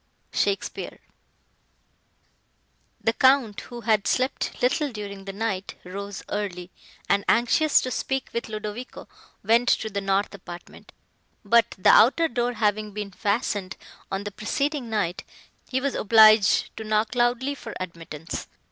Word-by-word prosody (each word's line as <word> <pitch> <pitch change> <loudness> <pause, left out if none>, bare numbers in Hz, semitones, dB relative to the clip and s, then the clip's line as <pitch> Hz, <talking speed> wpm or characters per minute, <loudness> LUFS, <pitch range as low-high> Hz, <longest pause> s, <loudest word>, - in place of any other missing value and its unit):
SHAKESPEARE 200 -1 -2 2.0
The 225 - +1
Count, 260 -4 +3
who 240 -1 -9
had 215 -3 +1
slept 255 +1 -1
little 285 +3 +1
during 200 -3 -7
the 195 - -5
night, 200 -2 -3
rose 200 +2 -7
early, 185 -3 -4 0.4
and, 200 - +2
anxious 285 +6 +4
to 255 - -4
speak 265 0 -2
with 235 -1 -3
Ludovico, 215 +3 -6 0.4
went 230 +4 +3
to 220 - +1
the 200 0 -2
north 195 +1 0
apartment; 175 -3 -11 0.5
but, 230 +2 +3
the 185 - +5
outer 270 +10 +6
door 245 -2 -1
having 215 -1 0
been 205 -1 -5
fastened, 200 -1 -2 0.3
on 195 +1 -2
the 205 - -5
preceding 275 +5 -2
night, 200 -5 -1 0.5
he 260 - 0
was 275 +1 -1
obliged 215 -1 +5
to 220 - -5
knock 215 +1 0
loudly 245 +3 +1
for 280 - -9
admittance. 165 -3 -6
215 Hz, 135 wpm, -25 LUFS, 200-240 Hz, 2.0 s, outer